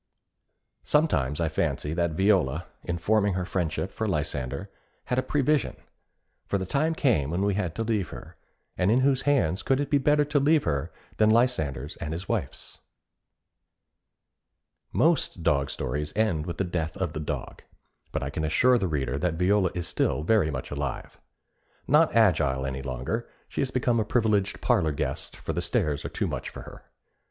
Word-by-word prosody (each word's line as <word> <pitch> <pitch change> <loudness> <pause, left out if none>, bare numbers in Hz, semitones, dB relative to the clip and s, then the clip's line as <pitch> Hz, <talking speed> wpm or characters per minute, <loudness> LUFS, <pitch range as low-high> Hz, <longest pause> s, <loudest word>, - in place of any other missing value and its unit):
Sometimes 80 - +1
I 85 - +1
fancy 80 -1 -1
that 85 -1 0
Viola, 90 -4 +2 0.2
in 85 -1 -2
forming 100 +2 +2
her 90 -1 -1
friendship 90 0 -2
for 110 - -3
Lysander, 75 0 -3 0.3
had 125 - 0
a - - +3
prevision; 145 +2 +1 0.7
for 100 - +1
the 95 - -3
time 155 - 0
came 110 - +2
when 90 +4 -1
we 100 0 +2
had 95 -5 -2
to 115 - -1
leave 110 -6 -1
her, - - -10 0.4
and 90 +1 +1
in 120 +4 +4
whose 135 -1 +3
hands 95 - +2
could 135 0 +1
it 145 - -2
be 145 - +4
better 145 +2 +3
to 145 0 +1
leave 150 +2 +3
her 70 -1 -1 0.3
than 110 0 +4
Lysander's 80 - +1
and 75 - -4
his 90 +4 -5
wife's? - - -4 2.1
Most 155 - +1
dog 70 -3 +2
stories 75 +1 -3
end 90 -8 +1
with 85 - -4
the - - +1
death 85 -2 -3
of 95 -5 -2
the - - -4
dog, 75 - -5 0.5
but 75 - -2
I 70 - -3
can 80 - -3
assure 120 +11 +4
the 95 - 0
reader 70 -4 -1
that 85 +1 0
Viola 95 +2 +3
is 90 -2 -3
still 75 - 0
very 95 -3 +3
much 65 -4 -5
alive. 70 -2 -4 0.7
Not 155 0 +4
agile 75 -12 +3
any 65 0 -3
longer, 65 - -3 0.2
she - - -3
has 135 - 0
become 120 -2 +1
a - - +2
privileged 105 -3 +1
parlor 80 -2 +2
guest, - - -4
for - - -4
the - - -1
stairs 75 -1 0
are - - -4
too - - -2
much - - -4
for - - -9
her. - - -12
90 Hz, 180 wpm, -27 LUFS, 75-115 Hz, 2.1 s, in